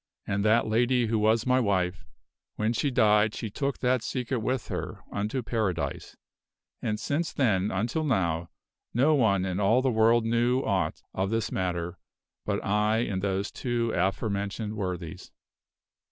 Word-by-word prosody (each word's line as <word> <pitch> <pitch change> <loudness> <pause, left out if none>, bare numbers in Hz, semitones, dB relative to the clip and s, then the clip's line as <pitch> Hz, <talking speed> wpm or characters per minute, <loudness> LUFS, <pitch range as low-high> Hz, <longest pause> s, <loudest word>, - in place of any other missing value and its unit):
And 100 0 -1
that 110 +2 +4
lady 120 +3 +2
who 110 0 0
was 110 +1 +3
my 130 0 +3
wife, 95 - 0 0.5
when 110 +2 0
she 140 +5 0
died 105 -4 +3
she 110 - -5
took 140 +4 -2
that 125 -1 +2
secret 125 0 -2
with 125 +2 -2
her - - -4
unto 105 +5 -2
Para 110 -6 0
dise, - - -5 0.6
and 105 0 -1
since 145 +8 -1
then 105 -7 +1
until 115 - -1
now 85 - 0 0.5
no 140 +6 +4
one 105 -9 +3
in 95 0 -2
all 110 +6 +3
the 130 - +2
world 115 +1 +4
knew 120 +3 +2
aught - - -1
of 95 +1 -1
this 115 0 -1
matter 90 -1 -2 0.5
but - - -1
I 105 +2 +2
and 95 -5 -2
those 100 0 -1
two 120 -2 -1
aforementioned 100 +3 -1
worthies. 90 -5 -5
110 Hz, 155 wpm, -27 LUFS, 100-120 Hz, 0.6 s, that